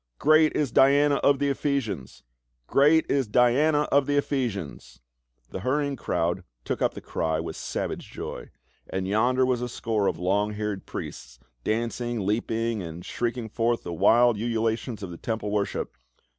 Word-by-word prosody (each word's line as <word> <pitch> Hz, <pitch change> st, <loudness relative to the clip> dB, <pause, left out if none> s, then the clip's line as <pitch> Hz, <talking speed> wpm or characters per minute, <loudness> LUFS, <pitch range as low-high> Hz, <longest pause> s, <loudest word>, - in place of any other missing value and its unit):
" -, -, -55 dB
Great 155 Hz, +1 st, +4 dB
is 145 Hz, -5 st, 0 dB
Diana 140 Hz, +1 st, +5 dB
of 140 Hz, -, +3 dB
the 140 Hz, +1 st, 0 dB
Ephesians! 130 Hz, -, -2 dB, 0.4 s
Great 150 Hz, -, +4 dB
is 135 Hz, -4 st, +1 dB
Diana 135 Hz, +7 st, +3 dB
of 140 Hz, -1 st, +3 dB
the 145 Hz, 0 st, +1 dB
Ephesians!" 105 Hz, -, -3 dB, 0.5 s
The -, -, -4 dB
hurrying 140 Hz, +6 st, 0 dB
crowds -, -, -1 dB, 0.2 s
took -, -, -3 dB
up -, -, +1 dB
the -, -, -7 dB
cry 80 Hz, -1 st, -1 dB
with -, -, -5 dB
savage -, -, -4 dB
joy. -, -, -7 dB, 0.4 s
And 95 Hz, 0 st, -2 dB
yonder 125 Hz, +6 st, +2 dB
was 125 Hz, -2 st, 0 dB
a 125 Hz, -, -3 dB
score 110 Hz, -4 st, -1 dB
of -, -, 0 dB
long 100 Hz, +4 st, 0 dB
haired 105 Hz, -2 st, -4 dB
priests, 65 Hz, -1 st, -7 dB, 0.3 s
dancing, 115 Hz, -1 st, -2 dB
leaping, 115 Hz, +1 st, -1 dB
and 85 Hz, 0 st, -8 dB
shrieking 120 Hz, -1 st, -3 dB
forth 115 Hz, +2 st, 0 dB
the 85 Hz, -, -5 dB
wild 120 Hz, +7 st, +4 dB
ululatus 115 Hz, 0 st, -2 dB
of 90 Hz, -, -6 dB
the 85 Hz, -, -8 dB
temple 110 Hz, -1 st, -3 dB
worship. 105 Hz, -1 st, -2 dB
115 Hz, 160 wpm, -26 LUFS, 105-135 Hz, 0.5 s, Diana